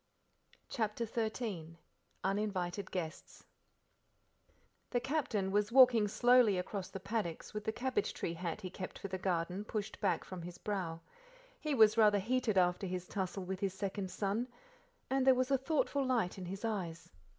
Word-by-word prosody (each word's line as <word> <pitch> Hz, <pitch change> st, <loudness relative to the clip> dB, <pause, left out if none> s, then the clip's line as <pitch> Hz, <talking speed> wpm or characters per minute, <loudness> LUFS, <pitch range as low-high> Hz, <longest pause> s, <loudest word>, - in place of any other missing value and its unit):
CHAPTER 225 Hz, -1 st, -1 dB
XIII 220 Hz, -7 st, -3 dB, 0.5 s
Uninvited 195 Hz, -1 st, -1 dB
Guests 170 Hz, -3 st, -6 dB, 1.4 s
The 245 Hz, -, +1 dB
captain 245 Hz, -8 st, -1 dB
was 205 Hz, +2 st, +1 dB
walking 245 Hz, -4 st, +7 dB
slowly 240 Hz, -2 st, +5 dB
across 185 Hz, +1 st, -3 dB
the 195 Hz, -, -6 dB
paddocks 195 Hz, -4 st, -3 dB
with 210 Hz, 0 st, -4 dB
the 220 Hz, -, +1 dB
cabbage 250 Hz, -1 st, -1 dB
tree 165 Hz, -, -2 dB
hat 170 Hz, +4 st, -4 dB
he 185 Hz, -2 st, -6 dB
kept 185 Hz, -1 st, -6 dB
for 200 Hz, -, -6 dB
the 185 Hz, 0 st, -3 dB
garden 180 Hz, +1 st, -1 dB
pushed 215 Hz, 0 st, -4 dB
back 200 Hz, -, +1 dB
from 185 Hz, -2 st, -7 dB
his 175 Hz, +1 st, -8 dB
brow. 180 Hz, -6 st, -3 dB, 0.6 s
He 305 Hz, -2 st, -1 dB
was 220 Hz, -1 st, +6 dB
rather 210 Hz, -2 st, +6 dB
heated 225 Hz, +1 st, +1 dB
after 180 Hz, +1 st, +3 dB
his 180 Hz, 0 st, -4 dB
tussle 190 Hz, -1 st, -3 dB
with 185 Hz, +1 st, -4 dB
his 195 Hz, -2 st, -1 dB
second 195 Hz, -1 st, -3 dB
son, 200 Hz, +5 st, -1 dB, 0.6 s
and 270 Hz, 0 st, +1 dB
there 260 Hz, -, +8 dB
was 255 Hz, +1 st, 0 dB
a 270 Hz, -, +5 dB
thoughtful 285 Hz, 0 st, +1 dB
light 235 Hz, -8 st, 0 dB
in 185 Hz, -, -5 dB
his 195 Hz, +4 st, -5 dB
eyes. 180 Hz, -7 st, -3 dB
200 Hz, 160 wpm, -34 LUFS, 185-230 Hz, 1.4 s, there